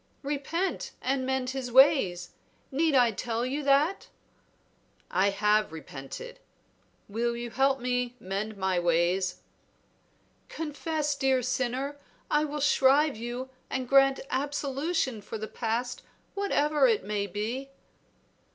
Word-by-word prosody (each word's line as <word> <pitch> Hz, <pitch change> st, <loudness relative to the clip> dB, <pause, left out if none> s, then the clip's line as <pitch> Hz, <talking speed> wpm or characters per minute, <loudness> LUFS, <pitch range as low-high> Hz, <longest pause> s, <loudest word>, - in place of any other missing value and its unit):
"Repent 295 Hz, +6 st, -2 dB
and 260 Hz, 0 st, -1 dB
mend 265 Hz, -1 st, -1 dB
his 260 Hz, -2 st, -4 dB
ways; 235 Hz, -, +5 dB, 0.4 s
need 305 Hz, +2 st, +2 dB
I 245 Hz, -3 st, +5 dB
tell 230 Hz, +3 st, -2 dB
you 275 Hz, +4 st, -2 dB
that?" 285 Hz, +6 st, +2 dB, 1.0 s
"I 190 Hz, +3 st, +3 dB
have 210 Hz, -1 st, +2 dB
repented; 160 Hz, -, -8 dB, 0.7 s
will 235 Hz, +3 st, -1 dB
you 240 Hz, 0 st, -5 dB
help 270 Hz, +1 st, +2 dB
me 245 Hz, 0 st, -1 dB
mend 200 Hz, +3 st, -4 dB
my 190 Hz, -2 st, +1 dB
ways?" 175 Hz, +2 st, +1 dB, 1.1 s
"Confess, 305 Hz, -1 st, -2 dB
dear 265 Hz, -2 st, +1 dB
sinner; 260 Hz, +3 st, -2 dB, 0.3 s
I 300 Hz, +1 st, +3 dB
will 295 Hz, 0 st, -4 dB
shrive 280 Hz, +1 st, +4 dB
you 240 Hz, +3 st, -5 dB, 0.2 s
and 260 Hz, -1 st, -2 dB
grant 270 Hz, 0 st, +5 dB
absolution 275 Hz, -1 st, -1 dB
for 215 Hz, +2 st, -6 dB
the 215 Hz, 0 st, -5 dB
past, 240 Hz, +2 st, -2 dB, 0.3 s
whatever 300 Hz, -8 st, +2 dB
it 225 Hz, -5 st, +2 dB
may 205 Hz, 0 st, -2 dB
be." 225 Hz, +8 st, -4 dB
255 Hz, 120 wpm, -28 LUFS, 215-280 Hz, 1.1 s, ways